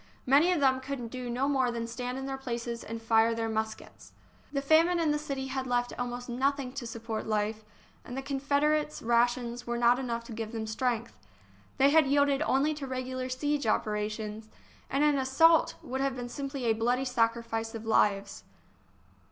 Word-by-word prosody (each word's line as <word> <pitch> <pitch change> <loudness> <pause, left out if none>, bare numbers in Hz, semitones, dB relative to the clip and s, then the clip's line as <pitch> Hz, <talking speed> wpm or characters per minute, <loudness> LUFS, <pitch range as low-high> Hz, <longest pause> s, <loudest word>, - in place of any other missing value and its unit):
Many 290 +7 +5
of 355 - +1
them 265 -2 +3
could 260 -4 -5
do 255 -1 -5
no 250 +3 0
more 265 -3 +2
than 235 -1 -3
stand 245 +2 -4
in 265 - -4
their 270 0 -3
places 235 -2 -4
and 230 +1 -6
fire 225 0 +3
their 225 0 -1
muskets. 220 0 -5 0.4
The 280 - 0
famine 330 +4 +4
in 320 -2 +2
the 295 - 0
city 275 -3 -4
had 265 0 -3
left 245 0 0
almost 245 0 -4
nothing 265 +1 -1
to 265 -3 -5
support 225 -1 -5
life, 215 0 -1 0.4
and 245 - -7
the 270 - -3
Confederates' 285 +2 0
rations 240 +1 +1
were 240 0 -1
not 240 +1 +4
enough 235 -3 -3
to 235 - -11
give 225 0 -5
them 220 -1 -3
strength. 235 +1 -2 0.6
They 275 +1 +5
had 315 -2 +5
yielded 285 0 +3
only 290 +1 +2
to 290 -2 -6
regular 255 0 -4
siege 285 +1 -1
operations 215 0 -2 0.2
— - - -28
and 275 +2 +1
an 295 -2 +3
assault 315 +5 +4
would 265 +2 -3
have 275 -1 0
been 245 -1 -5
simply 275 0 -5
a 225 - +4
bloody 245 +4 0
sacrifice 230 -2 -1
of 225 0 -7
lives. 205 -2 +1
250 Hz, 185 wpm, -29 LUFS, 230-275 Hz, 0.6 s, Many